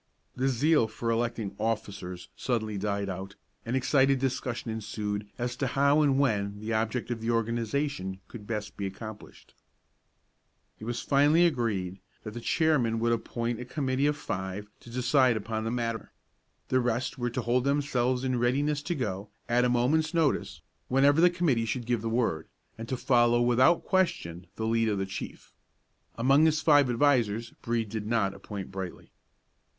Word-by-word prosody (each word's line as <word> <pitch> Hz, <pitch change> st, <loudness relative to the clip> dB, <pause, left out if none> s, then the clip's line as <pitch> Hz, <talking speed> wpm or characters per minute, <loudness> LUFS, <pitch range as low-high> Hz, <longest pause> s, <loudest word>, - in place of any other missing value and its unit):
The 130 Hz, +1 st, 0 dB
zeal 135 Hz, 0 st, +3 dB
for 115 Hz, +1 st, -3 dB
electing 115 Hz, -3 st, -2 dB
officers 100 Hz, -5 st, -3 dB
suddenly 110 Hz, -4 st, -2 dB
died 100 Hz, 0 st, -1 dB
out, 95 Hz, +1 st, -6 dB, 0.3 s
and 120 Hz, -, 0 dB
excited 135 Hz, +1 st, +3 dB
discussion 125 Hz, -3 st, -2 dB
ensued 105 Hz, -1 st, -4 dB
as 120 Hz, 0 st, -2 dB
to 135 Hz, -, 0 dB
how 140 Hz, +4 st, +3 dB
and 140 Hz, -3 st, +3 dB
when 105 Hz, -7 st, 0 dB
the 110 Hz, +2 st, -3 dB
object 115 Hz, +3 st, -1 dB
of 115 Hz, -2 st, -3 dB
the 115 Hz, -, -2 dB
organization 115 Hz, -2 st, -1 dB
could 105 Hz, -3 st, -10 dB
be -, -, -6 dB
best 105 Hz, -1 st, -5 dB
accomplished. 105 Hz, +2 st, -8 dB, 1.3 s
It 110 Hz, -, -8 dB
was 120 Hz, +1 st, -3 dB
finally 150 Hz, +5 st, +4 dB
agreed 105 Hz, -, -1 dB, 0.2 s
that 110 Hz, -, -7 dB
the 120 Hz, -, -6 dB
chairman 125 Hz, -7 st, +2 dB
should 115 Hz, +1 st, +1 dB
appoint 115 Hz, 0 st, -2 dB
a 125 Hz, -, -6 dB
committee 135 Hz, +1 st, 0 dB
of 150 Hz, 0 st, 0 dB
five 95 Hz, -2 st, -5 dB
to -, -, -14 dB
decide 125 Hz, 0 st, +3 dB
upon 110 Hz, +1 st, -3 dB
that -, -, -1 dB
matter. 115 Hz, -1 st, -3 dB, 0.6 s
The 130 Hz, -, +3 dB
rest 125 Hz, +2 st, -1 dB
were 120 Hz, 0 st, 0 dB
to 125 Hz, +2 st, -3 dB
hold 120 Hz, +2 st, +2 dB
themselves 130 Hz, -3 st, +1 dB
in 130 Hz, -2 st, 0 dB
readiness 140 Hz, +5 st, +1 dB
to 170 Hz, +4 st, -2 dB
go, 105 Hz, -, -3 dB, 0.2 s
at 120 Hz, +1 st, +3 dB
a -, -, +2 dB
moment's 155 Hz, +7 st, +2 dB
notice, 160 Hz, -4 st, 0 dB, 0.2 s
whenever 140 Hz, +4 st, +4 dB
the 180 Hz, -, +7 dB
committee 165 Hz, -10 st, +1 dB
should 115 Hz, +2 st, -3 dB
give 120 Hz, -2 st, 0 dB
the 115 Hz, -, -2 dB
word, 115 Hz, -9 st, 0 dB, 0.3 s
and 115 Hz, 0 st, -8 dB
to 130 Hz, -, -1 dB
follow 120 Hz, -2 st, +3 dB
without 125 Hz, +7 st, +4 dB
question 130 Hz, -, 0 dB
the 110 Hz, -, -3 dB
lead 115 Hz, 0 st, +2 dB
of 105 Hz, -, 0 dB
the 95 Hz, -, -1 dB
chief. 95 Hz, -, -8 dB, 0.6 s
Among 135 Hz, +6 st, +5 dB
his 155 Hz, -1 st, +2 dB
five 145 Hz, -4 st, +5 dB
advisers 120 Hz, -4 st, +2 dB
Brede 115 Hz, -2 st, -1 dB
did 105 Hz, -1 st, -4 dB
not 110 Hz, -4 st, +1 dB
appoint 100 Hz, 0 st, -7 dB
Brightly. 95 Hz, -2 st, -7 dB
120 Hz, 170 wpm, -28 LUFS, 110-135 Hz, 1.3 s, the